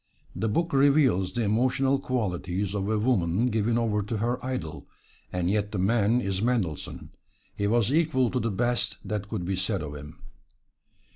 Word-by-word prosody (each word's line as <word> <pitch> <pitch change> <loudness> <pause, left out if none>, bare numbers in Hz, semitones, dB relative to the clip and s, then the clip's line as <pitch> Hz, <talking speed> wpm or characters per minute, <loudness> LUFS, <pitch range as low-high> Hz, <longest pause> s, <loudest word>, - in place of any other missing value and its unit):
The 110 - -1
book 170 +10 0
reveals 135 - +4
the 120 - -1
emotional 130 +5 +2
qualities 100 -7 -2
of 100 0 -2
a 110 - +1
woman 105 0 +1
given 115 +1 +1
over 110 -3 +1
to 110 +3 -3
her 120 +4 -1
idol, 125 -12 -4 0.4
and 90 -1 -1
yet 105 +1 0
the 105 - -3
man 110 +4 +2
is 95 -3 -2
Mendelssohn 110 - -2 0.4
he 100 - 0
was 115 +3 +2
equal 150 -7 +2
to 125 - 0
the 115 - -1
best 115 -1 0
that 105 -1 -3
could 100 -6 -3
be 95 +2 -1
said 95 -1 -1
of 75 -1 -6
him. 75 +2 -10
110 Hz, 170 wpm, -27 LUFS, 95-125 Hz, 0.4 s, reveals